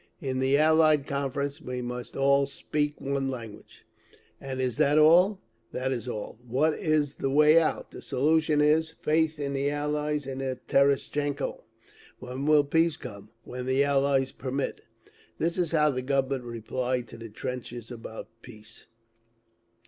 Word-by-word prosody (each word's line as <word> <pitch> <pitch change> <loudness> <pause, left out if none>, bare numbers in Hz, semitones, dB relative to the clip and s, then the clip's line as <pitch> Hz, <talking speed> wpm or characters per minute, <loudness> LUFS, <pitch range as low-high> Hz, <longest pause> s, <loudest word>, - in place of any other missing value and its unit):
In 130 -4 -3
the 135 +2 +3
Allied 155 -2 +4
Conference 140 +1 -3
we 125 -4 -5
must 125 0 -6
all 140 0 +3
'speak 150 +1 -2
one 135 0 -2
language.' 115 -5 -9 0.6
And 135 -1 -5
is 125 -3 -1
that 145 +2 +3
all? 175 +6 +5 0.3
That 130 +1 -2
is 125 -1 -3
all. 110 -1 -6
What 135 +6 +1
is 150 -3 0
the 135 - -1
way 150 +3 +6
out? 155 - -2
The - - -10
solution 155 +2 +2
is, 155 +2 +3
faith 160 0 0
in 140 -1 -3
the 140 +1 0
Allies 150 0 -2
and 135 0 -5
in 130 -1 -3
Terestchenko. 140 +1 +1 0.6
When 130 +3 -5
will 150 -1 +6
peace 160 +2 +1
come? 100 -4 -10
When 125 0 -6
the 130 +2 +3
Allies 140 -1 +2
permit. 135 +1 -4 0.6
That 170 +2 0
is 175 -3 0
how 150 -2 +3
the 130 -1 -3
Government 135 -1 -1
replied 120 +2 -3
to 115 - -10
the 115 0 -8
trenches 120 +1 -6
about 115 -2 -8
peace! 115 -2 -14
140 Hz, 155 wpm, -27 LUFS, 125-150 Hz, 0.6 s, way